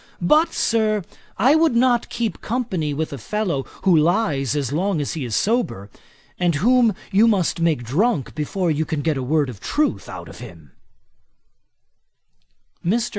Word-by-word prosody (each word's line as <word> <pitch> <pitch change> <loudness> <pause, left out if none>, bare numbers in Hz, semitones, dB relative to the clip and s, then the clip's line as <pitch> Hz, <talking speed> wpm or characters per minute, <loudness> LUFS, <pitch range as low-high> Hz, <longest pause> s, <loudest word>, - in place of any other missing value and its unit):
But, 305 - +4
Sir, 215 -3 +1 0.3
I 260 +6 +4
would 315 -4 +3
not 240 0 +2
keep 235 -2 -3
company 215 -11 -2
with 155 +1 -3
a 140 - -6
fellow, 175 - -2 0.2
who 185 -3 +4
lyes 155 - +1
as 140 -2 -2
long 185 +2 0
as 145 - -2
he 155 - -4
is 115 -3 -3
sober, 120 - -1 0.5
and 175 -3 +1
whom 230 - +3 0.2
you 210 +4 +5
must 190 -7 +1
make 160 -7 +1
drunk 160 - 0
before 165 +3 -1
you 155 +1 0
can 155 -2 -3
get 160 -2 +1
a 135 - -3
word 145 +3 +1
of 120 -6 -8
truth 300 - -1
out - - -8
of - - -12
him.' - - -12 2.1
Mr. 225 +7 0
175 Hz, 165 wpm, -21 LUFS, 145-230 Hz, 2.1 s, you